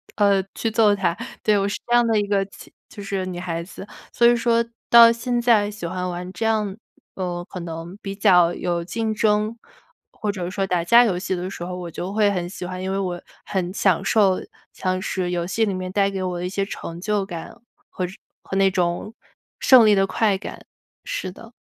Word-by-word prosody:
呃， 200 -2 +3
去 225 - -1
揍 210 -2 +4
他。 180 -4 0 0.3
对， 210 -2 +3
我 195 - 0
是 200 - -2
这 240 - 0
样 240 -1 +5
的 225 -1 +2
一 205 - +1
个 200 -1 +1
就 195 - -15 0.2
就 205 - -10
是 195 -1 -2
女 180 -1 -5
孩 170 -2 -3
子。 190 +2 -10 0.3
所 235 - +3
以 240 - +7
说 235 0 +2 0.3
到 235 -1 +9
现 240 +1 -1
在 225 -4 +4
喜 210 -4 -7
欢 180 +1 -3
玩 180 +1 -5
这 225 +5 -4
样， 215 -3 0 0.4
呃， 175 -2 -3
可 185 - -7
能 170 +2 -7
比 195 0 -5
较 180 -4 +4
有 175 -1 -2
竞 220 +5 -2
争， 215 0 +1 0.6
或 210 - -2
者 180 -3 -4
说 195 +1 -1
打 175 -3 0
架 235 +5 +7
游 190 -7 0
戏 190 0 -2
的 180 +1 -4
时 175 - -6
候， 180 0 -5
我 175 -2 -6
就 180 +4 -5
会 210 -1 +3
很 180 -3 -2
喜 180 0 -7
欢。 185 0 -5
因 190 +1 -2
为 195 - -1
我 180 -3 -3 0.2
很 185 -2 -2
享 190 -5 +2
受 195 -4 +3 0.3
像 185 -1 -2
是 185 -2 -2
游 175 -1 -1
戏 220 +5 +1
里 200 - -1
面 185 0 -4
带 200 0 +2
给 190 -1 -4
我 180 -1 -3
的 180 - -3
一 - - -2
些 195 +1 -1
成 170 -3 -7
就 205 0 0
感， 170 -4 -8 0.3
和 185 - -3
这 180 - -11 0.3
和 - - -6
那 195 0 +4
种 180 +3 -1 0.5
胜 250 -4 +7
利 210 - +6
的 195 -1 +3
快 205 -1 +1
感， - - -9 0.4
是 - - -4
的。 225 +2 -13
195 Hz, 240 characters per minute, -22 LUFS, 180-210 Hz, 0.6 s, 到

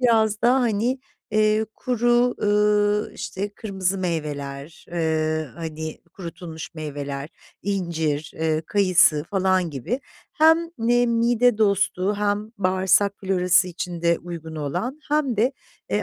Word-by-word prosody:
biraz 220 -3 +3
da 245 +2 +5
hani, 240 +3 +1 0.3
eee, 215 0 +2
kuru 240 0 +2
ııı, 210 0 +2
işte, 200 +2 -4
kırmızı 195 -3 -2
meyveler, 150 -4 -4
eee, 155 -2 0
hani, 160 -1 -6
kurutulmuş 170 -2 -8
meyveler, 145 -2 -5 0.3
incir, 160 -6 -2
eee, 160 0 0
kayısı 185 -6 +4
falan 185 -3 +1
gibi 150 - -3 0.3
hem 325 +1 +4
ne 240 +1 +3
mide 235 0 +3
dostu 200 -1 +2
hem 210 +1 -1
bağırsak 190 +1 +3
florası 185 -1 +3
için 175 -1 -5
de 170 0 +3
uygun 160 -2 -8
olan 180 - -3
hem 290 -6 +1
de, 245 +5 +2 0.4
eee, - - +1
190 Hz, 120 wpm, -23 LUFS, 160-220 Hz, 0.4 s, da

